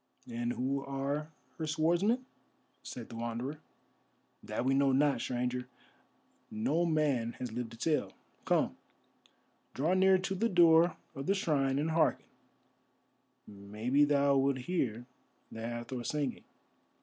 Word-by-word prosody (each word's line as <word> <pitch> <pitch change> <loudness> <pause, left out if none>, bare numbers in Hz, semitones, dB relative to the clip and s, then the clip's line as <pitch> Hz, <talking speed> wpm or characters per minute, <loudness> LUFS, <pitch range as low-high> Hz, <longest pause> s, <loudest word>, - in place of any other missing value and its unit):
"And 120 +1 -2
who 135 +2 -1
are 140 +3 -3 0.3
her 160 - -2
swordsmen?" 175 +11 +1 0.6
said 120 -3 -8
the - - -9
Wanderer. 120 +5 -4 0.8
"That - - -3
we 135 - +3
know 135 0 +3
not, 140 +2 +2
Stranger; 125 0 -2 0.8
no 150 +11 0
man 140 -8 +1
has 125 -1 -6
lived 120 0 -4
to - - -11
tell. 155 +5 0 0.3
Come, - - +1 1.0
draw 155 +7 +1
near 190 0 +5
to 190 +1 -3
the 225 +5 0
door 170 -2 +5 0.2
of 135 +1 -6
the 195 - +3
shrine 140 -7 +1
and 155 +3 0
hearken, 160 0 +2 1.2
maybe 105 +7 0
thou 140 -1 +3
wilt 135 0 +2
hear 125 -7 -2 0.5
the 115 - -7
Hathor 120 +2 -4
singing. 145 -1 -2
140 Hz, 130 wpm, -32 LUFS, 120-160 Hz, 1.2 s, near